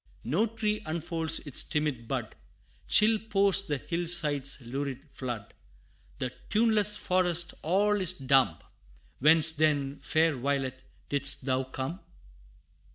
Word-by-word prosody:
No 225 - +1
tree 215 -1 -2
unfolds 160 0 -1
its 145 - +2
timid 150 -6 -3
bud - - -4 0.5
Chill 215 +1 +4
pours 200 -3 +3
the 150 -7 -3
hill 170 +4 -4
side's 145 -6 +2
lurid 135 +3 -5
flood 120 -6 -6 0.6
The 125 - -3 0.2
tuneless 210 -2 +3
forest 180 -2 +1
all 205 +5 +1
is 185 - +5
dumb 135 - +2 0.6
Whence 160 +3 +5
then, 145 -3 0
fair 160 -1 +1
violet, 135 0 -2 0.3
didst 140 -1 +1
thou 130 -1 0
come? 130 +7 -5
155 Hz, 120 wpm, -28 LUFS, 135-185 Hz, 0.6 s, is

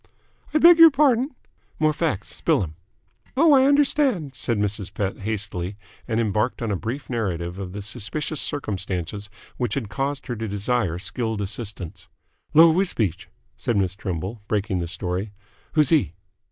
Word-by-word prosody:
"I - - +2
beg 340 +1 +8
your 330 0 +11
pardon?" 270 -2 +2 0.4
"More 155 0 +2
facts. 155 - -2
Spill - - +1
'm!" 80 -3 -6 0.6
"Oh, 315 +1 +6
I 265 -1 +6
understand," 275 - +2
said 120 -2 -1
Mrs. 100 -2 -2
Pett 100 -2 -3
hastily, 100 -2 -3 0.3
and 110 -1 0
embarked 110 +2 0
on 110 - -1
a - - +1
brief 115 +9 -5
narrative 90 -7 -3
of 95 -2 -5
the 100 0 -5
suspicious 135 +9 -2
circumstances 100 - -3 0.3
which 120 -5 -1
had 120 -7 -3
caused 140 +4 -2
her 120 - -3
to 110 +1 -3
desire 100 -3 0
skilled 110 +3 -3
assistance. 100 -3 -5 0.5
"Lor' 165 +1 +8
W'sbeach?" 110 - 0 0.3
said 110 - -1
Miss 95 -2 +1
Trimble, 95 +3 -4
breaking 100 -3 0
the 85 - -3
story. 90 +4 -3 0.4
"Who's 150 -3 +4
he?" 150 - +2
110 Hz, 155 wpm, -24 LUFS, 95-145 Hz, 0.6 s, your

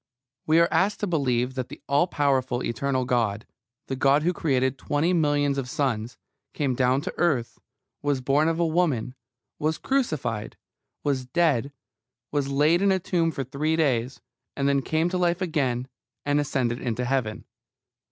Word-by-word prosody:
We 160 +1 +5
are 170 - +5
asked 200 +2 +1
to - - +1
believe 130 -8 0
that 130 -1 -4
the - - -10
all 145 +6 +3
powerful 130 -6 0
eternal 130 +2 -1
God, 115 -4 0 0.4
the 135 - -3
God 140 +3 +3
who 175 +2 +2
created 130 -5 0
twenty 155 +5 0
millions 145 -4 +2
of 125 -2 -4
suns, 120 -5 -2 0.4
came 140 -4 0
down 130 +2 +2
to - - -5
earth, 145 -9 0 0.4
was 145 -2 0
born 140 +4 +2
of 165 0 0
a 170 - +3
woman, 155 -8 0 0.5
was 155 +1 0
crucified, 155 - -2 0.5
was 130 -3 -1
dead, 145 -4 +1 0.6
was 145 -2 0
laid 150 +5 +3
in 200 0 +4
a 190 - +3
tomb 170 -2 0
for 140 -4 -3
three 145 +5 -1
days, 130 -5 0 0.4
and 140 0 +1
then 140 -1 +2
came 160 +5 0
to 180 0 -1
life 175 0 +1
again, 135 -9 -1 0.4
and 145 0 +2
ascended 130 -4 -1
into 125 0 -2
Heaven. 125 -4 -1
140 Hz, 165 wpm, -25 LUFS, 125-160 Hz, 0.6 s, We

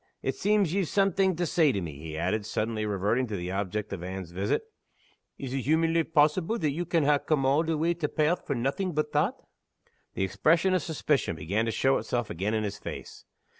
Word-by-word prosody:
It - - 0
seems 205 -5 +1
ye've 195 -3 +1
something 195 -1 +2
to 175 +2 -1
say 160 -3 +3
to 100 - -1
me," 80 -6 -6
he 80 0 -6
added, 105 +6 0
suddenly 110 0 -2
reverting 105 +5 0
to 110 - -4
the 90 -1 -4
object 100 +2 -3
of 95 - -5
Anne's 90 -1 -6
visit. 95 - -1 0.7
"Is 130 -2 -5
it 135 - 0
humanly 165 +4 +2
possible 160 +7 +2
that 155 -9 0
ye 165 +5 -2
can 170 -2 +1
ha' 145 0 +3
come 145 -4 +1
a' 140 +4 +3
the 165 -1 -1
way 165 +3 +2
to 165 -3 -2
Pairth 160 +3 0
for 140 - 0
naething 140 +10 -1
but 155 - 0
that?" - - +1 0.8
The - - 0
expression 155 - +2
of 185 - +2
suspicion 150 - 0
began 95 +8 -1
to 115 - -1
show 135 +4 +2
itself 120 -2 -2
again 100 +6 -1
in 110 - 0
his 105 0 -4
face. - - -8
135 Hz, 210 wpm, -28 LUFS, 100-165 Hz, 0.8 s, say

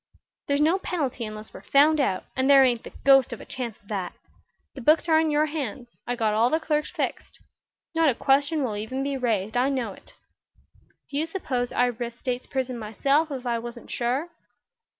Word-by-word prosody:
"There's 280 +1 +1
no 330 +6 +3
penalty 280 -11 -2
unless 215 0 -9
we're - - -10
found 300 +2 +4
out, 195 -10 0
and 260 +1 +1
there 275 -1 +8
ain't 240 -3 +1
the - - -10
ghost 270 -2 +6
of 235 - -6
a - - -10
chance 240 -4 -5
of 205 - -28
that. 190 -4 -3 0.6
The 270 - -8
books 310 +7 +4
are 315 -1 +5
in 320 -1 +2
your 300 0 +3
hands; 260 -6 -5
I 245 - -1
got 220 -3 +1
all 225 +3 +3
the 315 - +1
clerks 305 -1 -1
fixed. - - -4 0.6
Not 325 -2 +4
a 250 - +1
question 285 +4 +2
will 225 -5 -2
even 220 +6 -3
be 280 0 -2
raised. 220 -4 -1
I 250 +2 +3
know 250 -7 -2
it. - - -17 1.0
Do 280 - -2
you 315 - 0
suppose 260 -9 -2
I'd 245 -1 +1
risk 240 0 -5
state's 250 -1 -3
prison 255 -2 -3
myself, 275 +9 +1
if 265 -3 -6
I 235 -1 0
wasn't 235 +1 -9
sure?" 255 +7 -1
260 Hz, 205 wpm, -25 LUFS, 235-295 Hz, 1.0 s, there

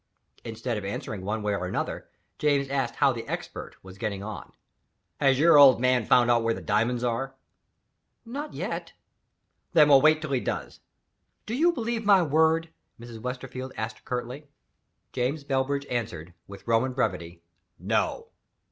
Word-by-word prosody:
Instead 115 +1 -4
of - - -10
answering 100 0 -5
one 105 +2 -3
way 105 -1 0
or 90 -2 -2
another, - - -4 0.3
James 140 -2 +1
asked 135 -1 -1
how 140 -2 +3
the 115 -1 -7
Expert - - -6
was 95 0 -13
getting 100 -3 -3
on. 105 0 -8 0.7
"Has 135 -2 +3
your 155 +1 +6
old 135 -4 +8
man 125 -2 +2
found 120 -1 +5
out 120 -1 +3
where 115 0 0
the - - -6
diamonds 120 +3 0
are?" 125 +3 -2 0.9
"Not 285 +6 -6
yet." - - -4 0.8
"Then 150 -3 +6
we'll 135 -2 +7
wait 155 +1 +5
till 155 -2 -6
he 135 - +2
does." - - -4 0.7
"Do 220 - -5
you 330 +8 +3
believe 235 -6 -3
my 200 -3 +5
word?" 160 +2 +2 0.3
Mrs. 115 -1 -10
Westerfield 130 +1 -6
asked 110 +1 -5
curtly. 125 +4 -5 0.7
James 130 +4 -1
Bellbridge 140 +1 -1
answered, 105 -9 -4
with 100 +3 -12
Roman 115 +3 +2
brevity, 85 -9 -3 0.3
"No." - - -1
125 Hz, 155 wpm, -26 LUFS, 115-145 Hz, 0.9 s, old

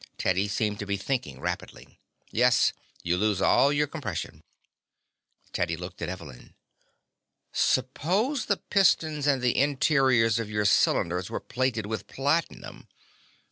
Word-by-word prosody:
Teddy 95 +2 +1
seemed 105 +1 -1
to 105 - -5
be 100 0 -1
thinking 130 +6 -3
rapidly. - - -6 0.3
"Yes. - - +3 0.3
You 85 +1 0
lose 105 -2 +1
all 140 +7 +4
your 145 0 +2
compression." 135 - -6 1.1
Teddy 85 - -1
looked 90 +1 -9
at 85 - -3
Evelyn. 85 -9 -10 1.0
"Suppose 185 - 0
the 200 - +1
pistons 160 -7 +1
and 135 -3 +2
the 125 - +2
interiors 135 -5 +3
of 115 -2 -4
your 105 -1 -1
cylinders 90 -2 +2
were - - -3
plated 125 -4 -2
with 110 +1 -5
platinum? 145 +5 -2
115 Hz, 130 wpm, -27 LUFS, 100-145 Hz, 1.1 s, all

